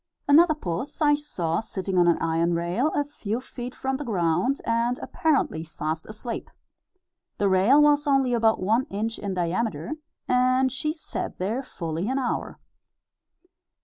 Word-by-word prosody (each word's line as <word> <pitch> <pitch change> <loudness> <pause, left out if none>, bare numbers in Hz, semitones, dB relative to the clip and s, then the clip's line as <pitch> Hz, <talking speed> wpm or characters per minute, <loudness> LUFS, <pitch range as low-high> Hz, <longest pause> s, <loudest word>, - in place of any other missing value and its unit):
Another 310 +2 +6
puss 255 - -4
I 295 -2 +4
saw 180 - -1
sitting 195 -3 -4
on 175 - +5
an 170 - +4
iron 165 +1 +1
rail, 175 - 0
a 290 - +2
few 235 -6 -4
feet 250 -1 -8
from 265 0 -2
the 295 - -5
ground, 185 - +1
and 235 +2 +1
apparently 280 - 0
fast 160 0 -4
asleep. 225 +2 -6 0.9
The 205 - +2
rail 195 +9 +5
was 295 0 +4
only 270 -3 +3
about 225 -2 +3
one 225 +7 +2
inch 220 +3 -3
in 200 -2 -3
diameter, 185 - -1 0.4
and 255 +1 +3
she 305 +4 -2
sat 315 0 -5
there 215 +8 -1
fully 170 - -4
an 265 - 0
hour. 260 -3 -2
230 Hz, 150 wpm, -25 LUFS, 180-270 Hz, 0.9 s, Another